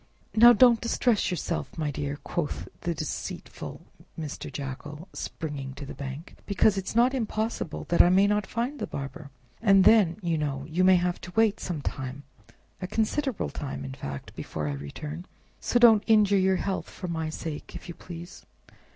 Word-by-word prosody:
"Now 235 +2 +9
don't 240 0 +6
distress 235 -2 +1
yourself, 105 - -3
my 155 -2 -1
dear!" 145 0 -3
quoth 170 -4 -3
the 170 -1 -2
deceitful 155 0 -6 0.4
Mr. 150 -2 -5
Jackal, 145 +4 -6
springing 140 -4 -5
to 140 +1 -7
the - - -7
bank, 140 +3 -7
"because 200 +1 +3
it's 195 +2 -4
not 245 +3 +4
impossible 220 - -2
that 170 - +6
I 175 - +6
may 190 +2 +5
not 210 -1 +1
find 245 +5 -2
the - - -3
barber, 140 +2 -6 0.3
and 195 -3 +6
then, 200 -6 +5
you 165 -2 0
know, 140 -2 -2
you 170 +3 +1
may 185 0 +7
have 175 0 0
to 180 - -9
wait 220 -2 +3
some 160 -6 -4
time, 135 +2 -4 0.6
a 185 - -3
considerable 225 +5 -1
time 140 -3 -5
in 135 - -6
fact, 70 - -7
before 75 - -4
I 70 - -1
return. 150 - -7 0.3
So - - +1
don't 230 -3 +7
injure 210 -3 +5
your 190 0 +3
health 190 +1 -2
for 180 - -7
my 160 -2 -2
sake, 155 -1 -6
if - - -9
you 170 - -6
please." 175 +1 -10
175 Hz, 175 wpm, -27 LUFS, 145-210 Hz, 0.6 s, Now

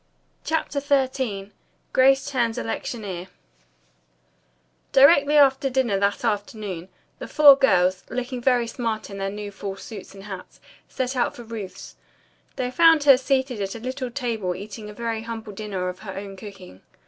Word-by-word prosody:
CHAPTER 315 -2 -1
XIII 260 -8 -1 0.4
GRACE 270 +1 +5
TURNS 235 -4 0
ELECTIONEER 180 - -4 1.6
Directly 285 +2 +6
after 270 -1 +4
dinner 250 -6 +1
that 200 +4 0
afternoon, 205 -4 -3 0.3
the - - -6
four 290 -2 +8
girls, 185 -8 +3
looking 250 0 -4
very 245 -1 +3
smart 230 -3 -4
in 195 - -7
their 195 0 -1
new 205 0 -6
fall 195 0 -6
suits 195 -1 -10
and 195 - -11
hats, 190 -3 -9 0.3
set 260 0 -2
out 245 - 0
for 240 - -9
Ruth's. 215 -5 -8 0.6
They 250 -2 -2
found 325 +1 +5
her 280 -2 +8
seated 260 -3 0
at 195 -1 -3
her 230 - -7
little 255 +2 -4
table 230 -8 -2
eating 210 +2 -8
a - - -9
very 230 0 -3
humble 225 -2 -7
dinner 195 -3 -4
of 180 0 -5
her 200 -3 -8
own 195 0 -7
cooking. 190 - -12
225 Hz, 155 wpm, -24 LUFS, 195-260 Hz, 1.6 s, four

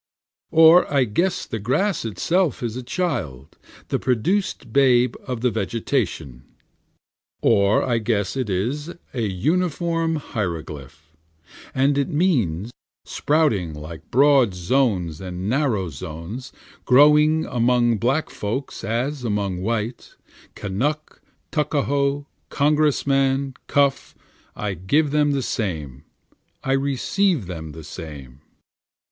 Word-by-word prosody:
Or 165 +2 +6
I 140 -2 +4
guess 170 - 0
the 110 - -5
grass 150 - 0
is 115 - -2
itself 170 - 0
a 120 +2 -3
child, 100 - -3 0.3
the - - 0
produced 130 - -1
babe 125 -3 +4
of 125 -3 -3
the 125 -1 +2
vegetation. 95 - -2 1.0
Or 100 +1 +4
I 120 -3 +1
guess 110 -2 -1
it 130 -5 -2
is 135 - -2 0.2
a 125 - -2
uniform 165 - 0
hieroglyphic, 80 - -5 0.8
And 140 +2 +2
it 140 - 0
means, 120 - 0 0.3
Sprouting 125 - +1
alike 80 +2 -8
in 80 - -37
broad 135 -6 +4
zones 90 - 0
and 90 0 -5
narrow 115 - 0
zones, 85 - -7 0.3
Growing 150 +4 +5
among 120 -2 +2
black 135 +9 0
folks 115 +7 -4
as 125 +6 -2
among 100 -5 -1
white, 115 +3 -3 0.4
Kanuck, 140 +10 -3 0.3
Tuckahoe, 145 -2 0 0.2
Congressman, 140 -2 +1
Cuff, 140 -1 +1 0.4
I 105 -2 -3
give 140 - +1
them 150 -1 +2
the 135 -2 -1
same, 75 - -4 0.6
I 135 - -1
receive 140 - +1
them 80 -4 -7
the 80 - -10
same. 75 -5 -9
125 Hz, 115 wpm, -22 LUFS, 95-145 Hz, 1.0 s, Or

